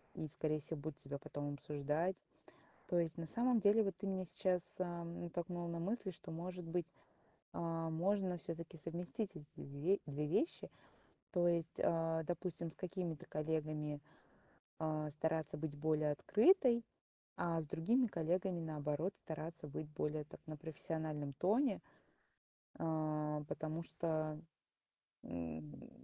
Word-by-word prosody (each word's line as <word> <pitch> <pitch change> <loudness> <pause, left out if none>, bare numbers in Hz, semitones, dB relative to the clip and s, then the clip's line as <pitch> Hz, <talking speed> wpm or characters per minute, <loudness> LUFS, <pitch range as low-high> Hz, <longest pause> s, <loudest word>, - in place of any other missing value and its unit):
и, 155 - -2
скорее 155 +1 0
всего, 155 +1 -4
будут 150 0 -4
тебя 140 +1 -4
потом 145 0 -3
обсуждать. 150 +6 0 0.7
То 175 - +3
есть, 165 0 -1
на 165 - -2
самом 240 +8 +3
деле, 210 +2 +7
вот 195 -4 0
ты 200 - -4
меня 190 -1 0
сейчас, 180 +1 +2 0.2
ам, 170 -2 -2
натолкнула 175 0 -2
на 170 0 -2
мысль, 195 +1 -1
что, 175 +1 -10
может 180 +2 -4
быть, 170 0 0 0.7
а, 165 -1 0
можно 185 +2 +2
всё-таки 165 0 -5
совместить 180 +5 -2
эт 155 - -7
эти - - -7
2 150 +8 +2
2 145 +1 -1
вещи. 310 - +1 0.6
То 175 -1 +4
есть, 170 -1 +1
а, 165 -1 +3
допустим, 170 0 -2
с - - -17
какими-то 180 -4 -3
коллегами, 150 -1 -1 0.8
а, 155 -1 0
стараться 155 0 0
быть 155 -1 -2
более 155 0 +2
открытой, 235 - +6 0.5
а 165 -1 +2
с - - -5
другими 235 - +3
коллегами, 175 0 +1
наоборот, 155 +3 0
стараться 160 0 -4
быть 150 +1 -4
более 150 0 -1
так, - - -11
на 155 - -3
профессиональном 155 -2 -3
тоне. 215 - +3 1.0
А 155 -1 +1
потому 160 +1 -2
что, 155 -2 -1 0.9
м 80 -2 -3
м 75 -3 -10
165 Hz, 140 wpm, -39 LUFS, 150-180 Hz, 1.0 s, деле